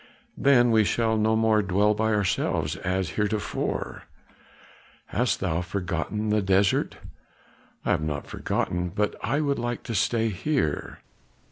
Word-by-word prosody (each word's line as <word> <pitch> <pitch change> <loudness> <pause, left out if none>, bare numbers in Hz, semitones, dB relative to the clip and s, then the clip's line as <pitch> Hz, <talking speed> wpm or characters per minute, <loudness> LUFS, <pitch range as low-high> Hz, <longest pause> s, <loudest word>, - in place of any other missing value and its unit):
"Then 120 -4 +4
we 110 -1 +5
shall 110 +2 +1
no 110 0 +2
more 110 -1 +3
dwell 100 +2 +2
by 110 +1 0
ourselves 105 -4 0
as 95 -2 -2
heretofore? 105 0 -2 1.0
Hast 120 -3 0
thou 90 -3 0
forgotten 95 +3 -3
the 105 0 +2
desert?" 95 0 +2 0.9
"I - - +2
have - - +2
not 75 -2 -3
forgotten, 90 0 -2
but 105 +4 -1
I 135 +7 0
would 140 -2 0
like 120 0 -3
to 115 - -5
stay 115 +2 +1
here." 105 - -2
105 Hz, 135 wpm, -26 LUFS, 95-115 Hz, 1.0 s, we